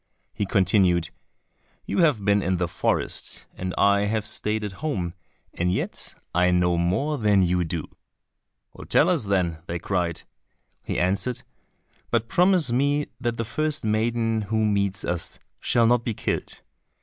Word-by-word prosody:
He 100 -1 -2
continued, 90 -4 +3 0.7
"You - - -1
have 145 - +3
been 100 0 +3
in 95 0 0
the 90 0 0
forest 85 - -1
and 90 0 -4
I 100 0 +4
have 110 0 -1
stayed 105 0 -2
at 105 - -3
home, 95 - -2 0.4
and 90 +1 0
yet 95 - -3 0.2
I 90 +1 +3
know 90 -1 +2
more 95 - 0
than 105 -3 +4
you 90 0 +1
do." 80 -1 -4 1.0
"Tell 160 - +4
us 165 - +1
then," 90 -5 0
they 85 - -2
cried. 85 -1 -2 0.6
He - - -4
answered, 95 +7 0 0.7
"But 115 -1 0
promise 180 -6 +3
me 145 +4 +1
that 120 -2 -2
the 115 - -2
first 155 +6 -1
maiden 115 +1 +1
who 110 0 +1
meets 100 -1 0
us 85 -1 -2 0.2
shall 120 -1 +3
not 120 0 +3
be 115 -3 -2
killed." - - -3
100 Hz, 150 wpm, -25 LUFS, 90-120 Hz, 1.0 s, I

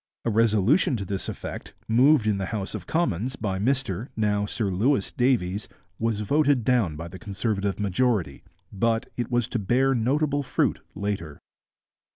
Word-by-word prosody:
A 115 - +1
resolution 115 - +3
to 100 - -4
this 95 +1 -4
effect, - - -7
moved 125 +2 +5
in 105 -2 +1
the 95 - -2
House 100 -3 -4
of - - -6
Commons 130 - 0
by 95 -6 -2
Mr, 125 -2 -1
now 105 -1 +1
Sir 105 -2 -2
Louis, 105 +4 +1
Davies, 110 -6 +1 0.3
was 110 -2 0
voted 140 +2 +2
down 110 -10 +2
by 80 +2 -6
the 95 +2 -10
Conservative 100 -2 -2
majority, 100 - 0 0.3
but 115 +3 0
it 120 -2 -3
was 120 -2 +1
to 120 - -1
bear 130 +7 +2
notable 145 +4 +1
fruit 135 - 0 0.2
later. 100 -7 -4
110 Hz, 160 wpm, -25 LUFS, 100-125 Hz, 0.3 s, moved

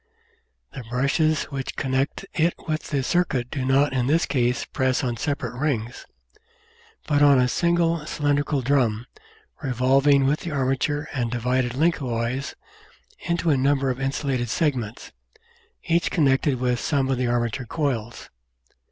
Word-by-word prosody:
The 130 - -7
brushes 140 +6 +1
which 135 -1 -4
connect 135 +6 -1
it 170 0 +1
with 155 0 -2
the 140 -2 0
circuit 130 -6 0
do 135 - -3
not 135 +2 +2
in 125 -2 0
this 160 +4 +2
case 125 -3 0
press 130 -1 0
on 120 -2 -1
separate 140 -3 -3
rings, 125 -4 -3 1.0
but 145 -2 +1
on 145 -2 +6
a 125 0 +3
single 170 +2 +1
cylindrical 145 -2 0
drum, 120 -4 +1 0.6
revolving 135 +1 +3
with 145 +3 +1
the 175 - -6
arma 135 -3 0
ture 145 +2 -2
and 120 -4 -1
divided 125 +1 -1
lengthwise 130 -4 -1 0.7
into 170 -1 +1
a 140 - +3
number 135 0 +2
of 125 +1 -5
insulated 135 -3 -1
segments, 125 -7 -2 0.7
each 170 +1 +1
connected 135 -3 +2
with 125 -1 0
some 140 -3 0
of 130 - 0
the 125 - 0
armature 120 +1 -1
coils. 120 -6 -3
135 Hz, 145 wpm, -24 LUFS, 125-145 Hz, 1.0 s, on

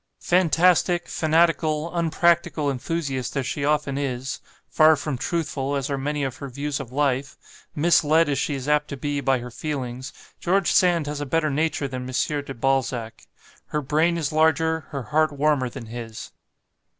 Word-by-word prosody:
"Fantastic, 175 0 +3
fanatical, 160 0 +1
unpractical 170 -3 +2
enthusiast 135 -2 -3
as 135 - -1
she 140 - -3
often 145 -1 0
is 130 -2 -3 0.3
far 155 0 +5
from 145 -1 -3
truthful 145 -1 -2
as 140 0 -2
are - - +1
many 145 +1 -2
of 135 -1 -3
her 140 - -7
views 140 +2 -3
of 130 -3 -7
life 135 -1 0 0.4
misled, 165 0 +4
as 140 -2 0
she 145 0 -1
is 135 0 -6
apt 150 0 +2
to 140 - -6
be, 145 +1 -2
by 135 -1 +2
her 125 0 -7
feelings 130 -2 -5 0.3
George 190 +1 +1
Sand 175 -4 +3
has 145 0 -4
a - - -2
better 155 +1 +1
nature 150 0 0
than 130 -1 -6
M. 145 +3 -1
de 135 - -7
Balzac; 120 -3 -1 0.4
her 150 - -2
brain 160 +5 +2
is 155 -4 -2
larger, 160 +1 +2
her 140 -3 -5
heart 155 +7 +1
warmer 145 -3 +1
than 120 -1 -8
his. 115 -1 -8
145 Hz, 170 wpm, -24 LUFS, 135-160 Hz, 0.4 s, far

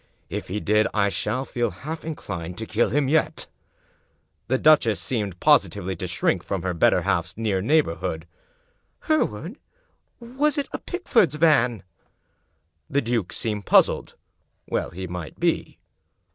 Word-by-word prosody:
If - - -4
he 100 +4 -3
did, 105 +1 +2
I 100 -1 +3
shall 120 +6 -2
feel 120 -3 -1
half 150 - -7
inclined 90 - -6
to 110 - -4
kill 110 +2 +1
him 145 -1 +1
yet." 155 +3 +1 1.0
The 130 - +2
duchess 135 -8 +4
seemed 105 -8 -3
positively 95 -1 +2
to 90 - -4
shrink 90 +1 0
from 95 -4 -3
her 90 -1 -1
better 85 - +3
half 85 - +1
s 90 - -13
near 105 -4 0
neighborhood. 150 +9 0 0.4
" - - -44
Hereward, 205 - -1 0.6
was 265 +5 0
it 285 - -1
a - - -3
Pickford's 230 - +1
van?^ 125 - +3 1.1
The 140 - +1
duke 115 -6 -1
seemed 105 -3 -3
puzzled. - - +3 0.5
Well - - -1
he 95 +3 -6
might 90 -4 -7
be. - - 0
115 Hz, 145 wpm, -24 LUFS, 95-155 Hz, 1.1 s, duchess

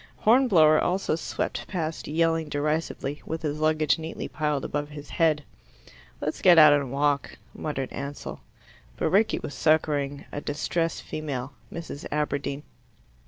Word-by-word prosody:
Hornblower 200 -11 +5
also 185 -1 0
swept 160 - -3
past 165 -4 -3
yelling 165 0 +1
derisively, 150 -1 -2
with 160 +1 -5
his 150 0 -2
luggage 155 -2 +2
neatly 160 0 -5
piled 150 -3 -1
above 145 0 -3
his 145 -1 -10
head. 155 -3 +2 0.8
"Let's 155 - -3
get 175 -3 +7
out 155 -2 +9
and 140 -3 0
walk," 140 0 0 0.2
muttered 135 -4 -4
Ansell. 140 +1 -6 0.6
But - - 0
Rickie 215 +4 +3
was 145 - -6
succouring 145 -3 +1
a 145 - -4
distressed 165 +3 -2
female 140 -4 -4 0.2
Mrs. 165 -3 -7
Aberdeen. 145 -1 -2
150 Hz, 135 wpm, -26 LUFS, 145-160 Hz, 0.8 s, out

